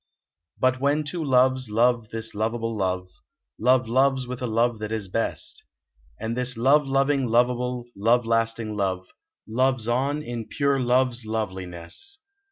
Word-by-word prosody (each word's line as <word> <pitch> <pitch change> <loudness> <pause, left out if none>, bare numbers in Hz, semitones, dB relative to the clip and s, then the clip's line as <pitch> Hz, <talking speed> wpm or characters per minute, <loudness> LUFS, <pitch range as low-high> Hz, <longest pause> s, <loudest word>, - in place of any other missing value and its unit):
Hut, 130 0 +3
when 145 +2 +2
two 160 +3 -4
loves 130 -2 +3
love 115 0 +2
this 110 0 -5
lovable 115 +2 -2
love. 95 -2 -1 0.5
Love 125 +1 +3
loves 130 +2 +2
with 125 0 -6
a 125 - -1
love 115 0 +1
that 110 0 -5
is 110 -3 -3
best; 115 +5 -3 0.6
And 115 +1 -3
this 125 -1 0
love 140 +5 +4
loving, 135 -1 +2
lovable, 125 +1 +1
love 115 +4 +2
lasting 115 -1 0
love 95 -2 -1 0.4
Loves 130 0 +1
on 140 +5 0
in 120 -3 -5
pure 140 -1 +1
love 130 +1 +3
s 120 0 -3
loveliness. 95 - -5
120 Hz, 150 wpm, -25 LUFS, 110-130 Hz, 0.6 s, love